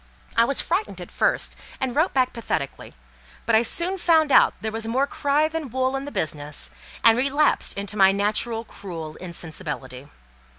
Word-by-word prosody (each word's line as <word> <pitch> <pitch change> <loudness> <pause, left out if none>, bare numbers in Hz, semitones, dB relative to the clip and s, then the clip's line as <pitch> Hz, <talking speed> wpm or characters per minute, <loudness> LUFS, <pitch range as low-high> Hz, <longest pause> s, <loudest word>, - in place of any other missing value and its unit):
I 230 - +5
was 275 +3 +2
frightened 375 +5 -2
at - - -9
first, - - +1 0.2
and 260 -2 -2
wrote 315 +5 +2
back 255 -2 +1
pathetically; 160 - -4 0.5
but 230 - 0
I 220 - +6
soon 345 +10 0
found 320 -4 +3
out - - +6
there 220 - -3
was 225 0 -3
more 260 +5 +1
cry 285 +2 +1
than 320 -3 -5
wool 260 +2 0
in 270 +1 -3
the 290 - -7
business, 150 - -3 0.3
and 225 -1 +7
relapsed 280 -1 +2
into 200 +1 -3
my 190 -1 +6
natural 215 +3 0
cruel 165 -8 -8
insensibility. 145 -6 -7
235 Hz, 170 wpm, -24 LUFS, 195-285 Hz, 0.5 s, and